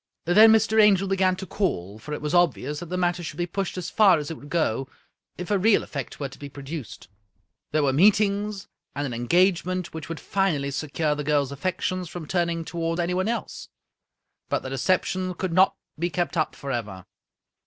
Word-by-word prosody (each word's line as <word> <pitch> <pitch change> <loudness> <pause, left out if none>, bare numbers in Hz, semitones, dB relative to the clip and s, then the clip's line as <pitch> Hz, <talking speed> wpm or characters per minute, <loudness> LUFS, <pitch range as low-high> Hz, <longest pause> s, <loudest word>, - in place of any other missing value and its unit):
Then 215 +6 +7
Mr. 220 0 +4
Angel 195 -2 +4
began 190 -1 +2
to 190 +1 -7
call, 105 - -2
for 150 - -10
it 150 - -4
was 150 - -2
obvious 150 -4 +2
that 175 - -7
the 180 +2 -3
matter 175 -1 0
should 165 - -7
be 175 - 0
pushed 185 +1 -4
as 180 - -4
far 205 -6 +5
as 150 0 -4
if 160 - -6
would 145 - -13
go, 135 -6 0 0.5
if 180 +3 -5
a 200 - +3
real 210 +2 +4
effect 140 -5 -6
were 140 - -2
to 135 - -14
be 145 - -7
produced. 140 - -8 0.6
There 155 0 +2
were 135 -2 +2
meetings, 200 +3 +2 0.3
and 145 +1 -2
an 130 - -4
engagement, 180 +7 +1
which 160 -1 -7
would 165 - -5
finally 160 -8 0
secure 150 +2 -1
the 150 0 -4
girl's 145 -2 +1
affections 185 +3 -2
from 175 -2 -7
turning 170 -1 -1
toward 165 0 -2
anyone 180 +3 0
else. 230 -1 -4 0.8
But - - -1
the 130 - -6
deception 185 +5 0
could 185 -1 -3
not 185 +2 +4 0.2
be 175 +2 0
kept 175 +2 -2
up 155 -2 0
forever. 110 -9 -5
170 Hz, 195 wpm, -25 LUFS, 145-185 Hz, 0.8 s, Then